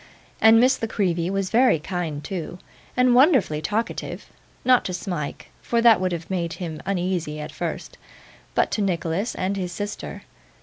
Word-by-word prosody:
And 225 +1 +7
Miss 260 +2 +3
La 225 - 0
Creevy 175 -5 0
was 195 -1 -2
very 245 -5 +5
kind 160 -2 -4
too, 180 -3 -5 0.4
and 250 -1 +5
wonderfully 250 - +4
talkative: 215 +7 -3 0.4
not 255 -1 +5
to 180 - -2
Smike, 175 -6 -5
for 235 - 0
that 230 -4 +6
would 185 -1 0
have 170 -1 -4
made 175 -3 -2
him 160 -4 -6
uneasy 180 -5 -1
at 150 - -6
first, - - -5 0.6
but - - +2
to 215 - -1
Nicholas 185 +2 -1
and 190 +2 -1
his 180 -2 -3
sister. 205 +4 -6
185 Hz, 165 wpm, -24 LUFS, 170-225 Hz, 0.6 s, And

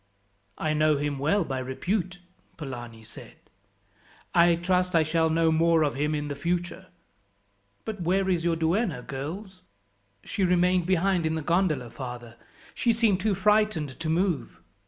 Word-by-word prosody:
"I 155 -1 -1
know 155 -1 +3
him 145 -1 -2
well 165 +8 +2
by 135 -4 -3
repute," 180 +8 -2 0.4
Polani 120 -6 -8
said. 110 - -13 1.0
"I 170 0 +5
trust 180 +1 0
I 165 - +5
shall 160 +1 +1
know 165 0 +2
more 165 0 +3
of 145 - 0
him 150 +2 -1
in 145 0 -3
the 145 - -4
future. 175 +4 -3 1.0
"But 215 -4 -5
where 190 +3 +1
is 175 -3 +1
your 170 -1 +1
duenna, 165 - 0
girls?" 180 +9 -7 0.6
"She 195 - -2
remained 180 0 +2
behind 185 -2 +2
in 160 - -1
the 160 - -3
gondola, 160 -8 0
father; 120 -3 -8 0.4
she 235 - +1
seemed 220 -5 +2
too 205 0 +1
frightened 210 -8 +1
to 165 -1 -3
move." 170 - -1
165 Hz, 155 wpm, -26 LUFS, 150-185 Hz, 1.0 s, I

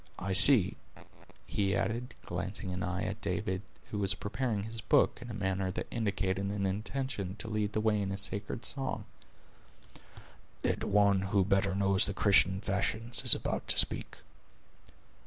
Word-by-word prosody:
I 95 +1 -3
see," 100 +2 +8 0.7
he 100 -1 -1
added, 115 +5 -3
glancing 95 +2 -5
an 90 - -4
eye 90 0 -2
at - - -5
David, 95 0 -2 0.3
who 105 - -3
was 100 0 +2
preparing 105 0 -3
his 110 +1 -6
book - - +2
in 120 - -9
a - - -6
manner 95 -1 -2
that 95 - -4
indicated 100 -4 -1
an 100 0 -2
intention 105 0 -3
to 110 - -5
lead 105 -1 -2
the 110 - 0
way 110 -1 +1
in 100 0 -3
sacred 100 +3 0
song, 135 -1 -3 1.6
"that - - -1
one 100 -1 +3
who 95 0 +1
better 95 0 +1
knows 100 +1 +2
the 100 - -4
Christian 95 -2 +3
fashions 110 +4 -2
is - - +7
about - - -4
to - - 0
speak." - - 0
100 Hz, 155 wpm, -31 LUFS, 95-110 Hz, 1.6 s, see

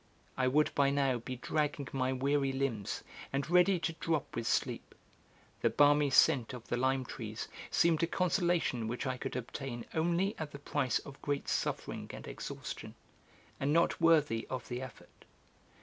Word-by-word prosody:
I 130 -1 +1
would 150 +4 +3
by 140 -1 +3
now 135 -3 +1
be 130 +2 -5
dragging 145 +2 -1
my 130 -1 +1
weary 135 +1 +1
limbs, 130 -7 -2 0.3
and 140 +1 -1
ready 180 +2 +5
to 165 - -1
drop 160 -2 -2
with 115 -1 -2
sleep; - - -1 0.7
the 115 - +4
balmy 145 +4 +5
scent 135 -2 +4
of 120 - -10
the - - +1
lime 130 +1 +1
trees - - -6 0.2
seemed 165 -2 +3
a 165 - +2
consolation 175 - +1
which 120 +5 -3
I 130 -1 -1
could - - -5
obtain 125 0 -5
only 175 +5 +1
at 155 -2 -5
the - - -6
price 140 -3 0
of 140 -1 -10
great 145 -1 -2
suffering - - -2
and - - -9
exhaustion, - - -6 0.6
and 140 +2 +1
not 170 +1 +2
worthy 150 -9 +4
of 130 -3 -4
the 125 0 -3
effort. 130 -1 -11
140 Hz, 165 wpm, -33 LUFS, 130-155 Hz, 0.7 s, ready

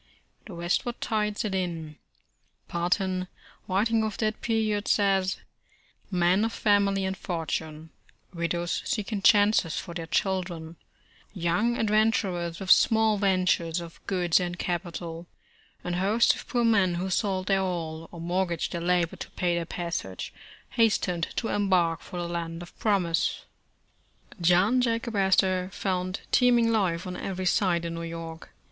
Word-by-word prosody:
The 195 - -8
westward 175 +8 -1
tide 210 -1 -1
set 210 -3 -2
in. 165 -5 -3 0.7
Parton, 185 +2 0 0.4
writing 220 +4 +2
of 215 -1 -3
that 215 -1 -1
period, 215 -2 0
says: 195 -2 +2 0.3
' - - -35
' - - -37
Men 185 +4 +4
of 225 - 0
family 200 -2 +2
and 190 0 -2
fortune; 160 -3 -4 0.4
widows 170 0 -1
seeking 210 -1 -2
chances 205 -5 +4
for 170 - -5
their 165 -1 -5
children; 175 -3 -2 0.6
young 185 +7 +1
adventurers 210 -6 +1
with 190 -2 0
small 220 -1 +5
'ventures' 185 -4 +1
of 170 -1 -10
goods 180 -4 +2
and 175 -1 -3
capital; 170 -1 -4 0.6
and 175 0 -2
hosts 210 +6 +3
of - - -9
poor 240 -2 0
men 200 -6 +3
who 185 +2 -3
sold 190 -1 0
their 195 0 +2
all, 165 -3 -4
or 170 - -9
mortgaged 175 0 -1
their 170 - -3
labor 175 -1 +1
to - - -7
pay 175 -1 -1
their 170 -1 -2
passage, 170 - -4 0.4
hastened 180 -7 +1
to 225 - -2
embark 185 -5 +2
for 180 - -8
the 175 - -3
land 170 0 -4
of 175 - -14
promise." 185 -6 +1 1.0
John 180 +9 +4
Jacob 230 -1 -1
Astor 190 -1 +2
found 185 0 -2
teeming 240 -2 +4
life 185 -6 0
on 180 0 -5
every 185 0 -4
side 175 -2 +2
in 170 - -3
New 165 - -5
York. 165 -1 -7
185 Hz, 145 wpm, -27 LUFS, 170-205 Hz, 1.0 s, small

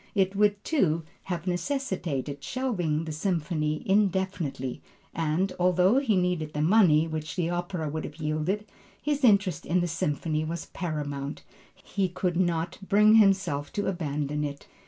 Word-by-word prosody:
It 195 -1 +2
would 205 0 +2
too, 170 - +1 0.2
have 175 -3 -3
necessitated 175 - -2
shelving 180 -12 -1
the 160 - -4
Symphony 155 -2 -1
indefinitely, 190 -9 0 0.3
and, 165 +4 0
although 180 +6 +4
he 245 -7 +1
needed 180 -4 0
the 150 - -1
money 165 -4 +5
which 155 -2 -4
the 175 -2 0
opera 175 -2 -2
would 155 +2 -3
have 150 - -8
yielded, 155 +6 -1 0.3
his 295 -1 -1
interest 200 - +4
in 180 +4 +1
the 175 - 0
Symphony 155 -1 -1
was 165 +1 -4
paramount; 145 -4 -4 0.3
he 195 -2 -2
could 180 0 -1
not 170 -2 0
bring 210 +2 +5
himself 190 -9 +3
to 205 - -1
abandon 150 -4 -2
it. 140 -1 -5
175 Hz, 145 wpm, -27 LUFS, 155-195 Hz, 0.3 s, money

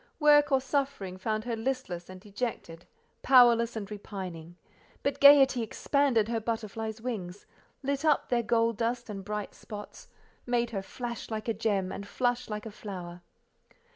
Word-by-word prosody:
Work 295 -1 +5
or 270 - +5
suffering 260 -8 -2
found 215 +2 -1
her 235 0 -2
listless 225 -8 -3
and 185 0 -9
dejected, 200 -5 -5 0.3
powerless 240 -3 +5
and 215 -2 -3
repining; 185 -5 -7 0.5
but 280 - -1
gaiety 275 -3 +7
expanded 240 0 +1
her 230 0 -1
butterfly's 220 0 -4
wings, 205 -6 -5 0.4
lit 280 +1 -1
up 305 -3 +2
their 240 -1 +2
gold 230 -1 +1
dust 235 0 -2
and 195 -2 -6
bright 210 +1 -4
spots, 210 - -10 0.4
made 240 -1 +1
her 195 -3 -2
flash 235 +4 -6
like 220 0 -4
a 230 - +1
gem, 200 -3 -1
and 200 - -6
flush 245 +3 -1
like 210 0 -5
a 220 - -6
flower. 180 -4 -8
225 Hz, 155 wpm, -29 LUFS, 200-250 Hz, 0.5 s, gaiety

